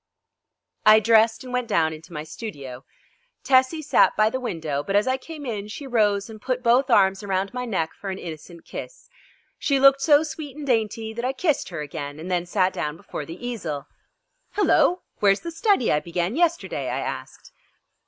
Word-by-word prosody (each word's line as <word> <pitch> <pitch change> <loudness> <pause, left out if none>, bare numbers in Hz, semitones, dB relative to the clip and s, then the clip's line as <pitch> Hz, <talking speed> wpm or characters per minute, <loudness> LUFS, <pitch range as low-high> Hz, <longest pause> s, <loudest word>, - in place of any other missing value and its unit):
I 215 0 +8
dressed 225 +1 +4
and 250 -1 -8
went 250 -1 -1
down 160 -4 +2
into 160 +2 -12
my 150 -2 -5
studio. 140 - -8 0.6
Tessie 265 +4 +3
sat - - +4
by 215 +1 +4
the 260 - -2
window, 160 - -3
but 195 +6 -3
as 205 - +4
I 260 0 +1
came 300 +2 -9
in 210 -4 -4
she 250 +7 -7
rose 210 -5 +1
and 220 -2 -11
put 255 0 -2
both 250 +3 +3
arms 195 -4 +4
around 195 0 -2
my 250 0 -3
neck 175 -9 -1
for 200 - -7
an 190 - -4
innocent 170 -1 -9
kiss. - - -9 0.5
She 280 -2 +1
looked 275 0 +6
so 295 +1 +5
sweet 300 -3 -7
and 300 - -6
dainty 225 -3 -1
that 235 +1 -5
I 255 +1 0
kissed 305 +1 0
her 170 -4 -5
again 145 0 -6
and 175 +4 -6
then 175 -1 0
sat 185 0 +1
down 150 +1 -3
before 150 -3 -7
the 175 +9 -8
easel. 155 - -4 0.7
"Hello! 365 -3 +3 0.2
Where's 200 -1 +3
the 340 - -5
study 330 - +2
I 150 - +3
began 175 +6 -2
yesterday?" 340 0 0
I - - -2
asked. - - -6
220 Hz, 195 wpm, -24 LUFS, 175-260 Hz, 0.7 s, I